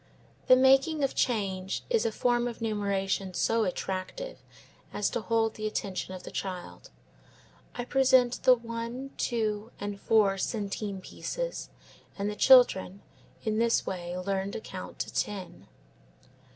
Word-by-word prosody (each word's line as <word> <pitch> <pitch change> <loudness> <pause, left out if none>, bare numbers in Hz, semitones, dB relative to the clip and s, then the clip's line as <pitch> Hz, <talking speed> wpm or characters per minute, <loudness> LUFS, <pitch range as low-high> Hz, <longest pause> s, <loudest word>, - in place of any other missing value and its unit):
The 255 - +9
making 270 +4 +4
of 275 - +1
change 195 -5 -1
is 465 - +2
a - - -1
form 240 +2 +1
of 235 - -6
numeration 200 -4 -1
so 225 +3 +2
attractive 190 - -4 0.5
as 205 - -1
to - - -2
hold 225 0 +1
the 215 0 -3
attention 190 -3 -3
of 185 - -10
the - - -8
child. 185 -2 -6 0.9
I 245 - -3
present 260 -2 +3
the 255 - +7
one, 235 +3 -6
two, 220 -2 -1
and 205 -1 -5
four 200 -3 +3
centime 200 -2 -3
pieces - - -5 0.5
and 205 +1 -1
the - - -6
children, 200 -6 +5 0.4
in 215 0 0
this 230 0 +2
way 175 -1 -4
learn 195 +1 -2
to - - -3
count - - -8
to - - -5
ten. 195 -4 -4
215 Hz, 140 wpm, -29 LUFS, 195-245 Hz, 0.9 s, The